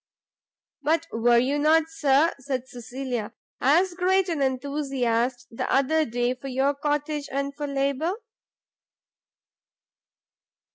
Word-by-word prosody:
"But 325 +2 +1
were 235 +1 +3
you 270 +5 +2
not, 315 +2 +4
Sir," 310 -1 +3
said 260 -1 -3
Cecilia, 245 -2 -5 0.3
"as 345 +7 +3
great 370 +1 +2
an 320 -4 -1
enthusiast 260 -3 -1
the 230 - -3
other 310 +4 +3
day 245 0 0
for 255 +2 -9
your 270 +2 +1
cottage, 295 0 -2
and 280 +1 -2
for 295 0 -4
labour?" 280 +4 0
275 Hz, 110 wpm, -25 LUFS, 255-305 Hz, 0.3 s, not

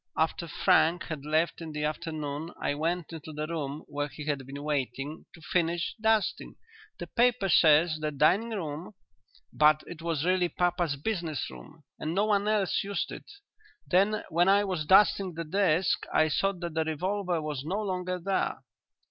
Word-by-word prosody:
After 165 +1 0
Frank 165 +3 +3
had 150 -3 -5
left 160 +3 +1
in 160 -2 -7
the 150 0 -3
afternoon 155 -1 -3
I - - 0
went 165 +3 -2
into 160 -1 -8
the 150 0 -4
room 155 -2 -4
where 145 0 -3
he 150 +1 -9
had 140 -3 -2
been 140 +1 -7
waiting, 145 +1 -3
to 165 - -16
finish 170 0 0
dusting. 220 -1 +1 0.4
The - - -6
paper 240 -4 +2
says 155 0 +5
the 155 0 -1
dining 155 +10 +2
room, 175 -2 -5 0.6
but 150 0 +4
it 170 -2 -9
was 165 -2 -1
really 180 -1 +2
papa's 175 -4 0
business 160 - -3
room 60 -1 -13 0.2
and 160 +2 -3
no 205 +2 +3
one 205 -1 +1
else 210 -3 +1
used 200 0 -3
it. - - -9 0.6
Then 200 +4 +2
when 175 +3 +3
I 200 +1 +5
was 180 -6 -3
dusting 190 -2 +4
the 165 - -3
desk 180 0 +1
I 155 - +3
saw 195 +6 +1
that 175 -3 -6
the 160 0 +1
revolver 180 +3 -1
was 150 -3 -4
no 185 +7 -2
longer 185 -3 -2
there." 190 +2 -1
165 Hz, 175 wpm, -28 LUFS, 150-185 Hz, 0.6 s, says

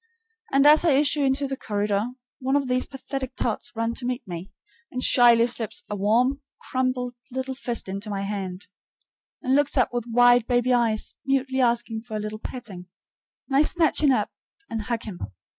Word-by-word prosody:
And 275 +1 +4
as 300 +2 +7
I 330 -4 +4
issue 290 +2 +3
into 275 +1 +1
the 270 - -3
corridor, 205 -2 -1 0.3
one 265 +1 0
of 280 -2 +1
these 255 0 0
pathetic 270 -1 -6
tots 235 -1 -3
runs 230 +1 -2
to 250 - -6
meet 250 -1 -4
me, 175 +2 -7 0.4
and 255 0 -3
shyly 235 -2 +6
slips 235 -3 -1
a - - -1
warm, 240 +8 +2 0.2
crumpled 255 -1 -2 0.2
little 260 +1 -4
fist 240 -4 -3
into 200 +3 -5
my 200 -1 -3
hand, 195 -2 -5 0.8
and 260 - +1
looks 290 0 +2
up 250 - +3
with 240 -1 -3
wide 245 0 +5
baby 245 0 +2
eyes, 230 -3 +1
mutely 265 -1 0
asking 235 -2 0
for 225 -1 -8
a - - -3
little 215 +1 -5
petting, 205 -8 -8 0.6
and 270 - -2
I - - +6
snatch 320 0 +2
him 290 -3 +5
up 255 - 0 0.4
and 225 -1 -2
hug 230 +1 -3
him. 200 -5 -8
245 Hz, 185 wpm, -25 LUFS, 220-265 Hz, 0.8 s, as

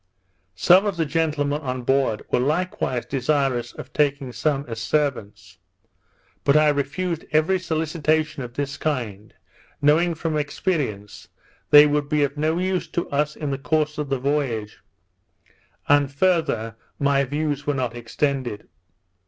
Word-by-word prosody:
Some 185 - +5
of 200 -3 -2
the 165 - +1
gentlemen 150 -2 0
on 130 -3 -4
board 135 -4 +1
were - - +3
likewise 145 -3 -1
desirous 135 -2 0
of 130 - -10
taking 140 -3 0
some 140 +3 -1
as 115 -1 -5
servants; 105 - -2 0.8
but 140 +2 +4
I 155 0 +5
refused 150 +4 -2
every 155 +5 +2
solicitation 155 -3 -1
of 120 -2 -8
this 140 0 -3
kind, 115 -9 -3 0.5
knowing, 160 +4 +3
from 160 -1 -2
experience, 140 - -3 0.4
they 145 0 +9
would 145 -1 0
be 150 -1 +2
of 140 0 -1
no 155 +2 0
use 185 0 -1
to 170 - -3
us 150 +1 0
in 150 -2 -4
the 135 - -3
course 150 +1 0
of 150 -2 -3
the 135 - 0
voyage; 130 -6 -2 1.1
and 145 -1 +4
farther 140 -9 0 0.2
my 140 -1 +2
views 145 +1 -2
were 145 - +1
not 125 -3 -2
extended. 120 -2 -2
145 Hz, 145 wpm, -23 LUFS, 130-155 Hz, 1.1 s, they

